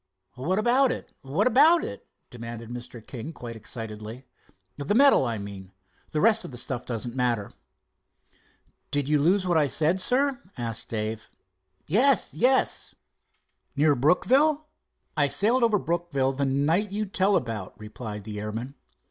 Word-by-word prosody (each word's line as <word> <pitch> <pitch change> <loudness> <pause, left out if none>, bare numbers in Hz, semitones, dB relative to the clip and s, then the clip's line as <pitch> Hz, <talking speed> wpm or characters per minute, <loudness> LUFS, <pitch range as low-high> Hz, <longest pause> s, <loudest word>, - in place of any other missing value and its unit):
"What 165 +9 -2
about 250 +4 +3
it—what 150 - -3
about 310 +8 +5
it?" 100 - -7 0.2
demanded 115 -1 -8
Mr. 120 -2 -8
King 125 +4 -7
quite 120 -5 -8
excitedly. 110 +2 -7 0.5
"The 145 +8 -2
medal, 275 - +5
I 115 -1 -2
mean. 100 -2 -9 0.4
The 155 - -2
rest 220 +4 +4
of - - -7
the 125 - -9
stuff 120 0 -4
doesn't 120 0 -3
matter." 120 -5 0 1.4
"Did 145 -2 -1
you 150 0 +3
lose 185 +5 +3
what 175 -2 +2
I 150 - +2
said, 160 - +2
sir?" 265 +4 +1 0.2
asked 115 -2 -4
Dave. 110 0 -4 0.6
"Yes, 250 - +3
yes!" 260 +3 +1 0.8
"Near 150 +1 +4
Brookville?" 275 - +2 0.5
"I 145 -2 +3
sailed 230 - +2
over 225 -3 +4
Brookville 150 -5 -1
the 140 +1 -1
night 150 +10 +1
you 210 +1 -2
tell 195 0 +1
about," 110 - -3
replied 105 -1 -7
the 105 0 -6
airman. 110 +5 -5
140 Hz, 145 wpm, -26 LUFS, -, 1.4 s, about